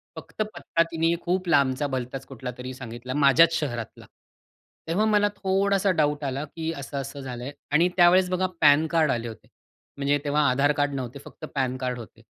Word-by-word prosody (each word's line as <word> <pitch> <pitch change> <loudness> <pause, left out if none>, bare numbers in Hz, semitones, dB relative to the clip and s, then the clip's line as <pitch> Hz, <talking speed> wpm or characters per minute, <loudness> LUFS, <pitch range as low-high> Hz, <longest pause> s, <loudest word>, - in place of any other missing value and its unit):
फक्त - - -7
पत्ता 165 - 0
तिने 165 +1 +1
खूप 185 +1 -1
लांबचा, 140 -1 +2
भलताच 130 0 -4
कुठलातरी 125 0 -7
सांगितला 125 0 -7
माझ्याच 150 +4 +5
शहरातला. 120 -7 -5 0.8
तेव्हा 190 +6 +1
मला 210 -1 +3
थोडासा 195 0 +1
डाउट 150 -1 +1
आला, 135 +1 -2
की 160 +2 -5
असं-असं 140 0 -6
झालंय 125 0 -6 0.2
आणि 165 +4 +4
त्यावेळेस 180 +1 +5
बघा 185 +1 0
पॅनकार्ड 155 +1 +4
आले 120 0 -2
होते. 110 -2 -11 0.5
म्हणजे 140 +1 +1
तेव्हा 145 +1 +1
आधारकार्ड 145 +2 +1
नव्हते. 130 0 -5
फक्त 155 - -10
पॅनकार्ड 130 -2 -2
होते. 115 - -12
145 Hz, 150 wpm, -25 LUFS, 130-165 Hz, 0.8 s, माझ्याच